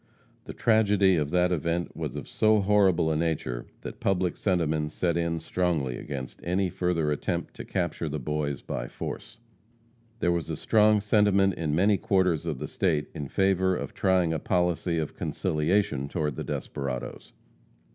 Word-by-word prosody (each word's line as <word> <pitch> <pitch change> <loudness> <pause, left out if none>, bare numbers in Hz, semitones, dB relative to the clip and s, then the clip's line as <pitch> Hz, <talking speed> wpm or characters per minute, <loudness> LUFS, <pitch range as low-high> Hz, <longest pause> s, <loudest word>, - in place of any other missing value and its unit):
The - - -7
tragedy 105 -4 +3
of 75 -3 0
that 90 +2 +2
event 85 +1 -1
was - - -4
of - - -6
so 110 0 +3
horrible 95 -5 +3
a - - +1
nature, 75 -7 -2
that - - -8
public 95 -2 0
sentiment 80 -5 0
set 85 +1 0
in 85 -1 0
strongly 80 -6 -1
against 65 -2 -7
any 90 +1 0
further 85 -4 0
attempt 75 - -2
to - - -7
capture 85 -3 -2
the 75 - -3
boys 70 0 -3
by - - -4
force. 115 - -7 0.8
There 90 - +1
was 85 -1 -2
a 80 - -3
strong 105 +1 +4
sentiment 100 -2 +3
in 80 -3 -2
many 100 +4 +4
quarters 95 -6 +1
of - - -2
the 75 +3 -5
state 80 -6 0
in 70 - -5
favor 95 +2 +2
of 70 -5 -5
trying 90 -3 +2
a 80 - -1
policy 90 0 0
of 80 -2 -3
conciliation 75 -3 0
toward 75 -2 -2
the - - -4
desperadoes. 65 -3 -5
85 Hz, 165 wpm, -27 LUFS, 75-95 Hz, 0.8 s, strong